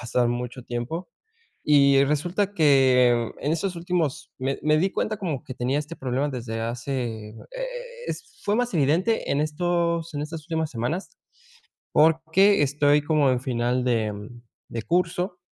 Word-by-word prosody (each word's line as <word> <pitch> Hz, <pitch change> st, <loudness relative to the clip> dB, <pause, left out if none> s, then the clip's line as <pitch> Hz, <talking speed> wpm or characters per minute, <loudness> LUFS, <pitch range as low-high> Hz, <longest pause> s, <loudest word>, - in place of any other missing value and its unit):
pasar 120 Hz, 0 st, +1 dB
mucho 120 Hz, +1 st, -4 dB
tiempo 125 Hz, +9 st, -4 dB, 0.6 s
y 140 Hz, -2 st, +5 dB
resulta 175 Hz, +8 st, 0 dB
que 130 Hz, -, +4 dB
en 150 Hz, -, 0 dB
estos 175 Hz, +2 st, -2 dB
últimos 170 Hz, -4 st, -2 dB
me 135 Hz, +1 st, -2 dB
me 155 Hz, 0 st, +3 dB
di 190 Hz, +5 st, +2 dB
cuenta 215 Hz, +2 st, -2 dB
como 165 Hz, -10 st, -3 dB
que 130 Hz, -4 st, -7 dB
tenía 130 Hz, +4 st, 0 dB
este 150 Hz, +3 st, -6 dB
problema 130 Hz, +2 st, -1 dB
desde 120 Hz, -4 st, -4 dB
hace, 115 Hz, -2 st, -3 dB
eh, 110 Hz, -, -14 dB, 0.7 s
es -, -, -7 dB
fue 205 Hz, +1 st, +1 dB
más 245 Hz, 0 st, 0 dB
evidente 165 Hz, +9 st, +1 dB
en 140 Hz, -, +1 dB
estos 170 Hz, +1 st, 0 dB
en 145 Hz, -, -2 dB
estas 155 Hz, +1 st, -6 dB
últimas 160 Hz, -1 st, -2 dB
semanas, 130 Hz, -, -3 dB, 0.8 s
porque 160 Hz, +5 st, +4 dB
estoy 145 Hz, +1 st, +3 dB
como 150 Hz, -2 st, +3 dB
en 125 Hz, -, +1 dB
final 125 Hz, 0 st, 0 dB
de 110 Hz, -4 st, -1 dB, 0.4 s
de 115 Hz, -, -4 dB
curso. 180 Hz, -, 0 dB
145 Hz, 150 wpm, -25 LUFS, 125-170 Hz, 0.8 s, y